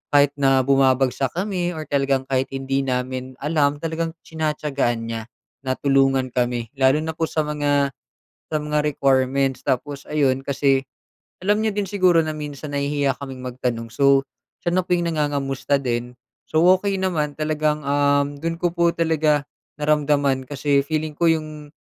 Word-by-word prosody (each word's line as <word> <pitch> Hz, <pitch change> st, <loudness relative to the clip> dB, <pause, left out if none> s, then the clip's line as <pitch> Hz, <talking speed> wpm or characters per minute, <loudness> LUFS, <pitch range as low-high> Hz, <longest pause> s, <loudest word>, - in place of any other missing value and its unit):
kahit 145 Hz, 0 st, +6 dB
na 135 Hz, -1 st, +4 dB
bumabagsak 135 Hz, 0 st, +2 dB
kami 180 Hz, -2 st, -2 dB
or 155 Hz, -, -4 dB
talagang 135 Hz, -1 st, +1 dB
kahit 130 Hz, 0 st, 0 dB
hindi 135 Hz, 0 st, -1 dB
namin 130 Hz, 0 st, -3 dB
alam, 150 Hz, -2 st, +2 dB
talagang 165 Hz, 0 st, -2 dB
tinatiyagaan 150 Hz, -7 st, -1 dB
niya 115 Hz, -1 st, -3 dB, 0.4 s
na 130 Hz, -1 st, -2 dB
tulungan 135 Hz, -2 st, +2 dB
kami, 120 Hz, -2 st, -1 dB
lalo 135 Hz, +4 st, +4 dB
na 160 Hz, -, -2 dB
po 160 Hz, 0 st, -2 dB
sa 155 Hz, -, -1 dB
mga, 145 Hz, -2 st, +1 dB, 0.6 s
sa 155 Hz, -, 0 dB
mga 150 Hz, 0 st, 0 dB
requirements. 135 Hz, -2 st, +1 dB
Tapos 140 Hz, +2 st, -3 dB
ayun 135 Hz, -3 st, +1 dB
kasi, 135 Hz, -1 st, +1 dB, 0.6 s
alam 205 Hz, +3 st, +1 dB
niya 220 Hz, -, +1 dB
din 205 Hz, -, +1 dB
siguro 185 Hz, -3 st, +3 dB
na 155 Hz, -, -2 dB
minsan 150 Hz, -1 st, -7 dB
nahihiya 140 Hz, -1 st, 0 dB
kaming 130 Hz, -2 st, -7 dB
magtanong 120 Hz, -2 st, -3 dB
so, 140 Hz, -1 st, +4 dB, 0.4 s
siya 175 Hz, -, +1 dB
na 185 Hz, -, +3 dB
po 180 Hz, 0 st, 0 dB
'yung 175 Hz, -, -1 dB
nangangamusta 145 Hz, -3 st, 0 dB
din. 125 Hz, -1 st, -3 dB, 0.3 s
So, 160 Hz, +1 st, +2 dB, 0.2 s
okey 200 Hz, 0 st, -1 dB
naman 160 Hz, -6 st, -1 dB
talagang, 155 Hz, -1 st, -1 dB
uhm, 145 Hz, 0 st, +1 dB
do'n 165 Hz, +1 st, -2 dB
ko 175 Hz, 0 st, -1 dB
po 170 Hz, -1 st, +1 dB
talaga 155 Hz, -3 st, +2 dB, 0.3 s
naramdaman 145 Hz, -3 st, +1 dB
kasi 140 Hz, 0 st, +1 dB
feeling 155 Hz, +2 st, -2 dB
ko 165 Hz, +3 st, +1 dB
'yung 155 Hz, -2 st, -2 dB
145 Hz, 155 wpm, -22 LUFS, 135-155 Hz, 0.6 s, kahit